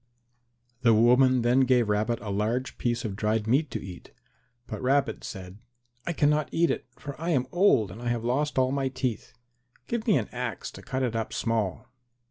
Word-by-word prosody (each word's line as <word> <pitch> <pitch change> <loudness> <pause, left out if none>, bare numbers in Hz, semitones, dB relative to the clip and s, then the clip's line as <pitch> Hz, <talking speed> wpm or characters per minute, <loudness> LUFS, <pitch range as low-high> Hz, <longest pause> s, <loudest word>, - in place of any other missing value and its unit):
The 115 -3 +5
woman 125 +2 +5
then 120 +2 +3
gave 125 -3 +3
Rabbit 110 +3 0
a 100 -1 -5
large 110 +6 -2
piece 120 -1 -1
of 100 -3 -3
dried 105 +1 0
meat 135 +6 +2
to - - -4
eat. 90 -2 -10 0.5
But - - -6
Rabbit 130 -3 +1
said, 95 +1 -8 0.5
"I - - +1
cannot 150 -1 +2
eat 170 +1 +2
it, - - -4
for 145 - -7
I 170 - -2
am 135 -7 +2
old 175 - +3
and 110 - -10
I 120 - -4
have 120 -1 -1
lost 140 +5 0
all 130 0 +3
my 135 -1 0
teeth. 130 -3 -3 0.5
Give 235 0 -3
me 210 - +5
an 110 - -2
axe 120 -5 -4
to - - -11
cut 130 0 -3
it 120 -3 -1
up 110 -1 -2
small." 110 -5 -1
120 Hz, 195 wpm, -27 LUFS, 110-135 Hz, 0.5 s, The